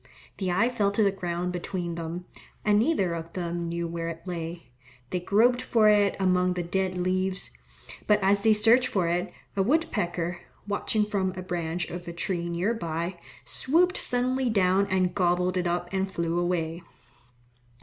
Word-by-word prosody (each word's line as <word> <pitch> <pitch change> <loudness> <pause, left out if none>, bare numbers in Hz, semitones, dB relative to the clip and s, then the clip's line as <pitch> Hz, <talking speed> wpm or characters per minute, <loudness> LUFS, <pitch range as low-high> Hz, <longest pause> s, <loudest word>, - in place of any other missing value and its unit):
The 185 -2 0
eye 195 +6 +3
fell 220 -5 +1
to 215 - +3
the 200 - +4
ground 180 -1 -3
between 175 -1 -3
them, 170 +2 -5 0.4
and 210 -1 +4
neither 215 - +1
of 165 0 -6
them 170 -1 -3
knew 170 0 -2
where 165 0 -4
it 165 +1 -7
lay. 170 -4 -6 0.4
They 180 - 0
groped 230 +7 +3
for 225 -4 +4
it 205 -1 +4
among 180 -1 +2
the 180 -1 -2
dead 185 +1 -1
leaves, 185 +1 -1 0.6
but 210 0 +5
as 200 +1 +3
they 220 0 +5
searched 230 +4 +5
for 185 -7 0
it, 175 +2 -1 0.2
a 195 - +2
wood 310 - +3
pecker, 175 -4 -2 0.3
watching 210 +1 0
from 195 -3 -1
a 185 - -5
branch 175 -1 -2
of 175 0 -7
a 170 - -5
tree 170 0 -2
near 175 +6 0
by, 170 -3 -3 0.3
swooped 355 +7 +2
suddenly 250 +1 +1
down 195 -2 +3
and 185 -2 +1
gobbled 180 -1 +1
it 180 -1 0
up 175 0 -1
and 190 0 -1
flew 170 -1 -1
away. 170 -1 -1
185 Hz, 175 wpm, -27 LUFS, 175-205 Hz, 0.6 s, but